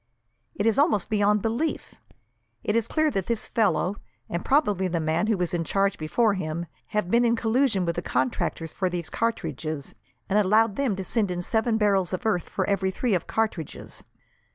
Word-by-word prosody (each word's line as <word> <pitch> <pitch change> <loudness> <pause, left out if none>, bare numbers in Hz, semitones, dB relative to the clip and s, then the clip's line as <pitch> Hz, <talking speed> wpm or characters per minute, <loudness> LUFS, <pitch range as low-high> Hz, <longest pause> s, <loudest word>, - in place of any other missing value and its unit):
It 205 - -1
is 225 +4 +3
almost 280 - +2
beyond 205 -1 +2
belief! 235 +9 -2 0.7
It 210 - 0
is 230 -2 +1
clear 310 -1 +1
that 195 -4 -2
this 230 -2 -1
fellow, 200 -2 +1 0.3
and 170 +1 -3
probably 205 - +2
the 170 -1 -1
man 160 +6 0
who 220 -2 +2
was 180 0 -1
in 170 -1 0
charge 195 +3 0
before 210 +8 +2
him, 170 -2 -3 0.2
have 210 -4 -2
been 235 +1 +4
in 235 -1 +3
collusion 225 -4 +1
with 170 -1 -2
the - - 0
contractors 130 +5 -1
for 185 -2 0
these 170 -3 -4
cartridges, 155 - -3 0.3
and 205 +1 +3
allowed 210 +1 +3
them 265 -8 0
to 190 - -4
send 210 0 0
in 175 0 -2
seven 220 +2 +1
barrels 195 -4 +2
of 185 - -3
earth 200 -6 0
for - - -1
every 195 -1 +1
three 220 +4 -1
of 180 - 0
cartridges. 215 -9 -3
200 Hz, 190 wpm, -26 LUFS, 175-225 Hz, 0.7 s, been